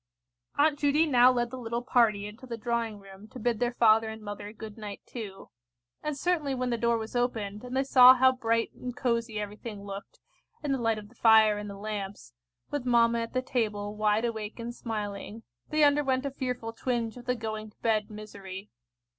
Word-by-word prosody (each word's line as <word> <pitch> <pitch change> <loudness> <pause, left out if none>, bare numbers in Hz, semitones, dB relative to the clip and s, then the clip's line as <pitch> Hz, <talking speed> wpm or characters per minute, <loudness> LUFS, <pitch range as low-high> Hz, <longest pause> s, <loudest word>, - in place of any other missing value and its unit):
Aunt 290 0 +3
Judy 295 +2 +3
now 255 -4 +6
led 240 -1 -1
the 260 - -6
little 235 0 -3
party 225 -5 +3
into 220 +5 -10
the 235 -2 -5
drawing 235 -2 -2
room 195 +1 -13
to 235 - -11
bid 235 -1 0
their 245 0 0
father 220 -1 +5
and 220 0 -7
mother 205 -1 -7
good 220 -1 -9
night 210 -2 -7
too. 205 -5 -8 0.5
And 300 -2 -3
certainly 305 -4 0
when 250 -1 -1
the 235 - 0
door 235 0 +2
was 220 +2 -6
opened, 220 -4 -1
and 250 +1 -4
they 270 - +3
saw 255 -1 +8
how 260 +1 +5
bright 230 -2 0
and 250 -1 -7
cosy 235 -3 -1
everything 210 0 -6
looked, 200 0 -8 0.4
in 290 - -1
the 270 - +1
light 225 -1 +1
of 210 -1 -8
the - - -20
fire 220 -2 +5
and 210 0 -6
the 200 - -8
lamps, 200 - -6 0.4
with 290 -3 -2
mamma 235 -1 +3
at 230 0 -4
the 255 0 0
table, 210 -5 -2
wide 215 +2 +2
awake 220 -2 -4
and 235 +1 -5
smiling, 215 -1 -5 0.3
they 305 0 +3
underwent 285 -2 +3
a 280 - -2
fearful 250 -4 -4
twinge 235 -2 -2
of 245 -1 -11
the 250 0 0
going 215 -2 -5
to 210 - -27
bed 215 -2 +1
misery. 205 -2 -9
230 Hz, 205 wpm, -29 LUFS, 210-250 Hz, 0.5 s, saw